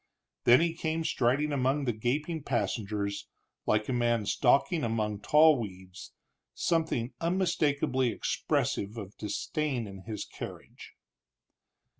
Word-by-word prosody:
Then 120 +5 +7
he 170 -1 +1
came 165 -1 -2
striding 140 +2 +1
among 135 +1 +1
the 120 - +1
gaping 150 +9 -2
passengers, 105 -6 -2 0.4
like 105 0 +2
a 130 - -1
man 120 -3 +1
stalking 140 - +2
among 110 -3 -1
tall 150 +4 +5
weeds, 95 -4 -8 0.4
something 160 -8 0
unmistakably 155 -7 +1
expressive 105 -1 -1
of 100 -2 -7
disdain 125 +4 -2
in 95 -2 -9
his 105 -3 -4
carriage. - - -10
125 Hz, 115 wpm, -29 LUFS, 110-150 Hz, 0.4 s, Then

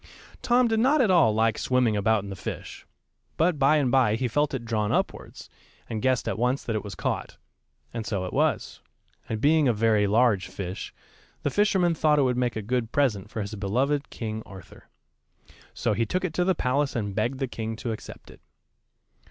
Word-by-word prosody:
Tom 245 0 +3
did 225 -1 +1
not 275 +6 +3
at 225 -7 +4
all 165 -11 +5
like 110 +1 +1
swimming 125 -4 +2
about 105 0 +2
in 100 - -7
the - - -5
fish, - - -7 0.5
but 165 -1 +2
by 145 +2 +4
and 135 -5 +1
by 125 -5 +3
he 125 +2 -1
felt 145 +5 +1
it 130 -4 -4
drawn 110 -2 -1
upwards, - - -3 0.4
and 110 -2 -4
guessed 130 -4 +1
at - - -2
once 125 +3 0
that 115 - -3
it 110 - -2
was 100 -3 -7
caught. - - -3 0.6
And 115 -1 -3
so 100 -4 -2
it 90 - -6
was; - - 0 0.5
and 110 - -2
being 150 +3 +4
a 120 - +3
very 110 -1 +2
large 105 -2 +3
fish, 95 -1 -6 0.5
the - - 0
fisherman 190 -4 +2
thought 155 -2 +2
it 145 - +4
would 125 -2 +1
make 125 -2 0
a 110 - -4
good 120 +1 -1
present 110 -8 0
for 110 - -4
his 100 +1 -5
beloved 130 +9 -1
King 110 -1 -5
Arthur. 95 -3 -14 0.8
So - - -1
he 115 +2 0
took 185 - -1
it 170 - -3
to 180 - +1
the 190 0 +2
palace 140 +1 0
and 100 -4 -2
begged 115 +6 -1
the 135 0 -2
king 115 -2 -5
to 115 +1 -4
accept 110 - -9
it. - - -18
120 Hz, 205 wpm, -26 LUFS, 110-145 Hz, 0.8 s, all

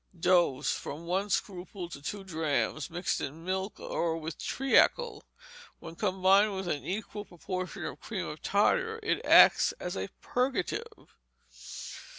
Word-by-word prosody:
Dose, 165 -6 +3
from 155 +4 -6
one 190 +4 -1
scruple 185 -2 -3
to 140 - -9
two 195 +7 -5
drachms, 155 -4 -1
mixed 175 +2 -2
in 160 +5 -6
milk 190 +2 -3
or 165 -1 -1
with 160 0 -6
treacle. 420 - +2 0.6
When 165 - -9
combined 195 +2 +3
with 190 -1 -4
an 150 -4 -2
equal 205 +1 -4
proportion 185 0 -5
of - - -6
cream - - -4
of - - -7
tartar, 450 0 +2
it 425 - 0
acts - - +7
as - - -5
a - - -3
purgative. 275 - -2
185 Hz, 140 wpm, -30 LUFS, 165-205 Hz, 0.6 s, acts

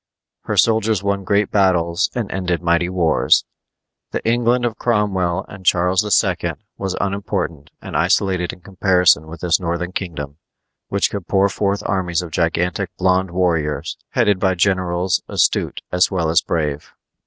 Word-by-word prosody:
Her - - -2
soldiers 110 -2 +2
won 100 0 -1
great 100 +2 +1
battles 85 -4 +2
and 120 -5 -3
ended 90 -2 -2
mighty 85 +1 +2
wars. 85 -4 +2 0.6
The - - -4
England 120 +1 +2
of 115 -2 -3
Cromwell 100 -7 0
and 95 -1 -11
Charles 90 +2 +2 0.2
II. - - -2 0.2
was 95 -2 -3
unimportant 95 -6 -3
and - - -7
isolated 90 -3 +1
in 90 - -14
comparison 90 -5 +2
with 85 +2 -10
this 85 -2 +2
northern 90 0 -3
kingdom, 75 -7 -5 0.5
which 100 - 0
could 100 -4 -5
pour 100 0 +3
forth 100 +1 -1
armies 90 -3 -1
of 85 - -8
gigantic 85 +3 0
blond 95 0 +2
warriors, 85 -4 -1
headed 100 -2 +2
by 95 -1 +1
generals 90 0 +1
astute - - 0
as 90 +1 +3
well 85 -5 0
as 85 - +4
brave. 75 -3 -3
90 Hz, 150 wpm, -19 LUFS, 85-100 Hz, 0.6 s, as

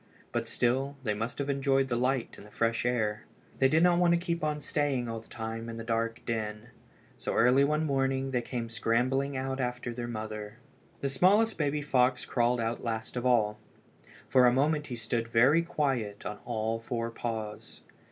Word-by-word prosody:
But - - -2
still, 135 +3 0
they 110 -4 0
must 115 +3 -4
have 140 - -2
enjoyed 135 -1 +2
the 125 - -1
light 125 0 0
and 105 - -13
the - - -18
fresh 115 +2 0
air. 110 -3 -1 0.3
They 135 - +5
did 160 +4 +4
not 175 -1 +5
want 175 -1 +4
to - - +1
keep 170 -2 -2
on 150 -1 0
staying 140 -4 -1
all 115 0 -4
the 110 - -17
time 115 0 -5
in 115 - -6
the 115 - -5
dark 115 +1 -1
den. 110 -1 -3 0.5
So - - -3
early 125 +4 +5
one 150 +2 +1
morning 135 -1 0
they 125 -2 +1
came 120 -1 -4
scrambling 125 +5 0
out 135 0 -3
after 125 -1 -2
their 120 0 -4
mother. 110 -1 -6 0.4
The 140 - 0
smallest 200 +11 +4
baby 145 0 0
fox 125 -2 +2
crawled 120 0 +1
out 115 0 -2
last 110 0 -3
of 125 0 0
all. 105 -4 +2 0.7
For 125 -1 +5
a - - +5
moment 150 +4 +1
he 125 - -4
stood 115 0 -2
very 125 +8 +5
quiet 135 -11 -2
on 105 0 -5
all 115 -1 -1
four 115 0 -3
paws. 110 -3 -5
125 Hz, 190 wpm, -30 LUFS, 115-135 Hz, 0.7 s, They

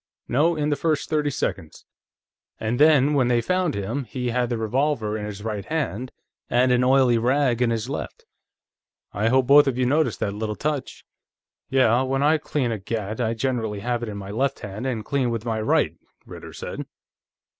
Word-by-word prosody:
No, 155 +7 +2
in 150 -1 -1
the - - +2
first 155 -1 -1
thirty 150 -2 +1
seconds. 95 - -4 0.7
And 110 +2 -2
then, 150 -2 +5
when 135 -4 +3
they 120 -1 +3
found 180 +4 0
him, 110 +8 -3
he 125 +2 -3
had 120 0 0
the 120 - -1
revolver 110 -1 0
in 105 -1 -4
his 100 -1 -7
right 105 -3 -3
hand, 130 -5 -3 0.4
and 125 +1 +3
an 125 0 +3
oily 130 -2 +4
rag 125 0 +1
in 125 - +3
his 115 0 -2
left. 140 - -6 0.9
I 105 +3 0
hope 130 +2 +3
both 145 +2 +7
of 130 -2 0
you 130 - +1
noticed 150 +5 +1
that 100 - -1
little 105 0 -3
touch." 150 0 -4 0.6
"Yeah. 125 -2 +3
When 135 +1 0
I 155 +2 +4
clean 135 -4 -1
a 110 - -3
gat, 110 +3 -4
I 115 -1 0
generally 110 -4 -2
have 120 +1 -1
it 120 - -4
in 105 - -6
my 100 0 -7
left 135 +5 -1
hand, 105 +5 -5
and 115 -5 -3
clean 135 -3 0
with 115 -1 -3
my 110 -2 -1
right," 110 - +2 0.3
Ritter - - -10
said. - - -6
125 Hz, 195 wpm, -24 LUFS, 110-140 Hz, 0.9 s, both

